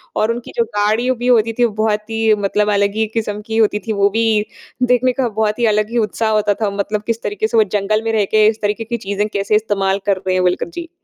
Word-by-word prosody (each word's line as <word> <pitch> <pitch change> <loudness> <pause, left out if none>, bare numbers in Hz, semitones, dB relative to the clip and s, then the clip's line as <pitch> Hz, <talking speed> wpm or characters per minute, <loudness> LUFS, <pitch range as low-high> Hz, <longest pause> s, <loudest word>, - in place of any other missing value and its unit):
और 215 +2 +1
उनकी 235 +1 -6
जो 235 - +3
गाड़ियों 225 +5 +1
भी 245 +1 -3
होती 230 -2 +3
थी, 240 - +5
वो 235 - -1
बहुत 215 0 -1
ही 225 -1 +2
मतलब 210 +1 +1
अलग 200 0 +1
ही 220 0 0
किस्म 210 -2 -3
की 225 0 -2
होती 210 -2 +2
थी। 220 - 0
वो 200 -1 +2
भी 220 0 +1 0.4
देखने 250 +1 +3
का 250 - +1
बहुत 215 +1 -1
ही 240 - +2
अलग 215 0 0
ही 240 - -1
उत्साह 220 0 0
होता 210 -1 +2
था 215 - +1
मतलब 205 +1 -2
किस 230 0 -2
तरीके 205 +1 -1
से 230 - -1
वो 220 - +6
जंगल 215 +2 0
में 225 - -1
रह 215 -2 +2
के 215 0 +5
इस 220 0 0
तरीके 210 +2 -1
की 235 +1 -3
चीज़ें 205 -1 -2
कैसे 200 0 0
इस्तेमाल 200 -2 0
कर 200 -2 +2
रहे 185 0 -2
हैं 185 - +1
बोलकर 180 0 0
जी। 340 -1 -6
215 Hz, 260 wpm, -17 LUFS, 205-225 Hz, 0.4 s, वो